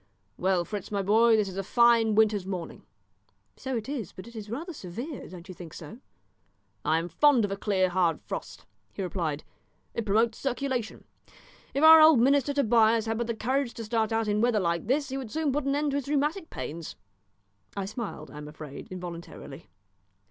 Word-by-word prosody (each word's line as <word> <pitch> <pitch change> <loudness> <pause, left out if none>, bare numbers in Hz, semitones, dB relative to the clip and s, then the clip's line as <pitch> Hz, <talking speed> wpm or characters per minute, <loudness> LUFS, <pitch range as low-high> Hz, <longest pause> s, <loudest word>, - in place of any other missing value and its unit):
"Well, 185 -1 +1
Fritz, 205 -1 -6
my 200 -1 -1
boy, 225 +3 +5
this 210 -2 +1
is 190 0 -7
a 195 - -1
fine 230 0 +4
winter's 210 -3 +3
morning." 180 -4 -5 0.7
"So 260 -2 -3
it 225 - -5
is, 265 - -5
but 185 - -10
it 235 - -13
is 215 -2 -7
rather 320 - -5
severe; 245 - -7
don't 175 -1 -11
you 185 - -8
think 170 -3 -11
so?" 165 +9 -10 0.8
"I 155 +2 +2
am 165 +1 -2
fond 250 - +4
of 200 - -5
a - - -1
clear 195 -2 +1
hard 175 -2 +1
frost," - - -7 0.3
he 195 - -4
replied; 165 -5 -3 0.5
"it 230 - -2
promotes 220 +2 +1
circulation. 260 -3 -3 0.7
If 280 - +1
our 320 0 +10
old 310 -4 +7
minister 275 +3 +3
Tobias 230 -4 +3
had 225 0 -2
but 235 - -1
the 235 - -2
courage 255 +3 -1
to 230 - -6
start 220 0 0
out 225 -1 0
in 210 0 +1
weather 235 -2 +3
like 170 -1 -1
this 280 +3 +1
he 265 - -3
would 260 -4 -6
soon 310 +2 -1
put 285 +1 -1
an 275 0 +1
end 295 0 0
to 280 - 0
his 280 - -4
rheumatic 300 +5 0
pains." 165 +1 -6 0.8
I 195 - -2
smiled, 215 +2 -6
I 150 - -9
am 150 - -8
afraid, 150 -2 -9
involuntarily. 175 -2 -8
220 Hz, 200 wpm, -28 LUFS, 185-265 Hz, 0.8 s, our